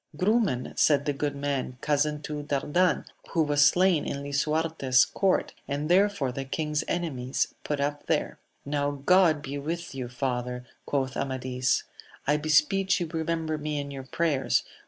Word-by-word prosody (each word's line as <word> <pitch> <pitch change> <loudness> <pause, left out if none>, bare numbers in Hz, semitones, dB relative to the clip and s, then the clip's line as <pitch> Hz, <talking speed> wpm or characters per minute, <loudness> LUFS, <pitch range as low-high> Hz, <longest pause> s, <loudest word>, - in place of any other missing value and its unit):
Grumen, 190 - +1
said 145 -2 +4
the 145 - 0
good 145 +1 -2
man, 140 -3 -2
cousin 150 0 0
to 150 0 -4
Dardan 145 +5 +1 0.2
who 165 - +2
was 145 -1 +3
slain 180 -1 +4
in 140 0 -4
Lisuarte's 145 -2 +2
court, 190 +7 0
and 145 +2 -2
therefore 190 -8 +3
the 135 +2 -4
king's 150 +2 -2
enemies 135 -7 -1
put 150 -1 -2
up 145 +1 -2
there. 160 -2 -1 0.3
Now 145 0 0
God 155 +1 +3
be 140 +1 -4
with 165 +3 -4
you, 130 -2 -5
father! 125 0 -3 0.2
quoth 135 -2 -1
Amadis; 130 -2 0 0.4
I 150 +2 +3
beseech 155 +6 +3
you 170 -2 -3
remember 160 -1 -1
me 150 0 -3
in 140 0 -5
your 135 -1 -6
prayers 145 -2 +1
145 Hz, 155 wpm, -27 LUFS, 135-160 Hz, 0.4 s, said